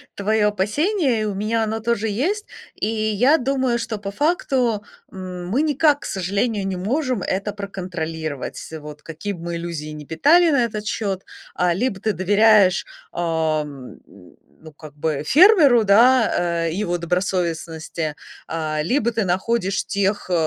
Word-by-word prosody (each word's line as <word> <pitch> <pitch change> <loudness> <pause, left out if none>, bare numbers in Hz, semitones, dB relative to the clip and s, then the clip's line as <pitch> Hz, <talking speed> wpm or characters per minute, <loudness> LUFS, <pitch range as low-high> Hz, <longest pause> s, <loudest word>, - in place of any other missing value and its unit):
твое 210 +1 +1
опасение, 250 - 0
и - - 0
у 210 - -2
меня 220 +3 -1
оно 220 0 -2
тоже 225 -1 -1
есть. 365 - -1 0.3
И - - -2
я 220 +6 +2
думаю, 260 -2 0
что 230 -2 -4
по 200 0 -6
факту, 255 - 0 0.3
м, 180 -2 -7
мы 255 +8 +1
никак, 295 -1 +2
к - - -9
сожалению, 200 +2 -1
не 190 - -2
можем 250 - -1
это 195 +3 -2
проконтролировать, 165 -7 -5 0.2
вот 150 0 -10
какие 165 +6 -6
б 175 - -10
мы 170 0 -4
иллюзии 165 -3 -5
не 150 -1 -8
питали 325 - +4
на 280 -4 +3
этот 215 -2 -5
счет. 195 -4 -2 0.3
А, 180 -1 +2
либо 200 0 -1
ты 215 +1 -1
доверяешь, 200 0 +4 0.3
ам, 155 -5 -2 0.7
ну, 155 - -11
как 150 -1 -13
бы, 150 -1 -2
фермеру, 295 - +6
да, 200 -6 +3
э, - - -2
его 175 -2 -2
добросовестности, 170 -3 -2 0.3
а, 155 -2 -2
либо 235 - +1
ты 225 -2 -1
находишь 190 +2 0
тех, 200 -1 -1
э, - - 0
200 Hz, 150 wpm, -21 LUFS, 170-235 Hz, 0.7 s, фермеру